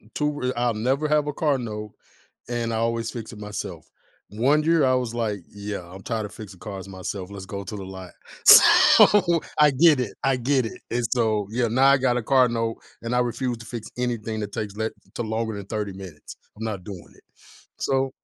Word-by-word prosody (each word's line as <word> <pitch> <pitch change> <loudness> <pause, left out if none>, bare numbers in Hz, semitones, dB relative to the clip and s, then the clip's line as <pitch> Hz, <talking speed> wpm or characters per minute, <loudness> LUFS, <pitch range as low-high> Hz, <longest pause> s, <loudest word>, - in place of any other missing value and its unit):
2 150 -1 -1
r 125 0 -1
I'll 120 -1 +1
never 130 +8 0
have 150 -1 +2
a 150 - -2
car 145 -2 +1
note, 105 -3 -6 0.6
and 120 -1 -2
I - - 0
always 115 0 -1
fix 115 -2 -7
it 110 - -10
myself. 105 0 -7 0.4
One 135 +8 +2
year, 165 -2 +3
I 130 -1 +3
was 125 -2 -1
like, 110 -4 -2
"Yeah, 100 0 -6
I'm 95 +2 -11
tired 110 -1 -3
of 100 - -13
fixing 105 -5 -10
cars 100 -3 -7
myself. 95 0 -6
Let's 100 -2 -8
go 100 0 -6
to 105 - -6
the 95 - -7
lot." 95 -1 -9 0.3
So, 175 -5 +7 0.2
I 150 -1 +7
get 145 +1 +5
it, 120 -5 -3
I 135 - +3
get 130 0 +1
it, - - -8
and 120 0 -1
so, 110 -4 +1
yeah, 120 +1 0
now 130 +4 +3
I 140 - +6
got 125 -2 +1
a - - -3
car 130 +2 +4
note 115 -1 -2 0.3
and 115 +1 -2
I 125 - +3
refuse 120 0 -1
to 110 - -11
fix 110 -1 -7
anything 115 -3 -2
that 105 -1 -5
takes 105 -2 -5
le 110 +1 -1 0.2
to - - -3
longer 110 0 -2
than 100 - -7
30 105 -2 -3
minutes. 95 -6 -10 0.2
I'm 110 - -6
not 100 -5 -4
doing 95 -4 -10
it, - - -23 0.5
so 135 0 0
115 Hz, 215 wpm, -24 LUFS, 105-130 Hz, 0.6 s, So